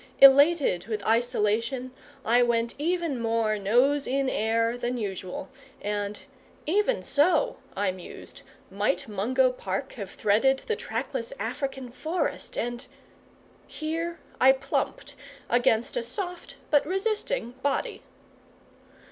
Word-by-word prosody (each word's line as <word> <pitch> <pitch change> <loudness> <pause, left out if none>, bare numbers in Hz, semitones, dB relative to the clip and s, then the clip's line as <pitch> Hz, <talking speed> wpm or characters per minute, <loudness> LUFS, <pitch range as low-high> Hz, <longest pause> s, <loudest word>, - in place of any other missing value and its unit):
Elated 275 - +6
with 215 -3 -3
isolation, 235 +2 +1 0.3
I 240 +2 +4
went 235 -1 +1
even 330 -5 -1
more 225 -2 +1
nose 250 +8 +3
in 270 +1 +1
air 230 +2 +1
than 245 0 -2
usual: 190 -4 -4 0.3
and 205 0 -3 0.5
"even 415 +9 +1
so," 300 +1 +2 0.2
I 195 -1 +1
mused, 185 -1 -11 0.3
"might 205 +8 0
Mungo 250 +6 +2
Park 250 +1 -4
have 200 -6 -6
threaded 230 +9 +2
the 445 - 0
trackless 485 +1 -4
African 270 - -4
forest 315 +8 -3
and..." 240 0 -2 0.8
Here 330 +2 -3 0.2
I 265 +1 +7
plumped 275 - -3 0.4
against 240 - +2
a - - 0
soft, 360 -10 -6 0.2
but 290 -2 +5
resisting 415 - -1
body. 280 -1 -1
250 Hz, 115 wpm, -27 LUFS, 220-300 Hz, 0.8 s, I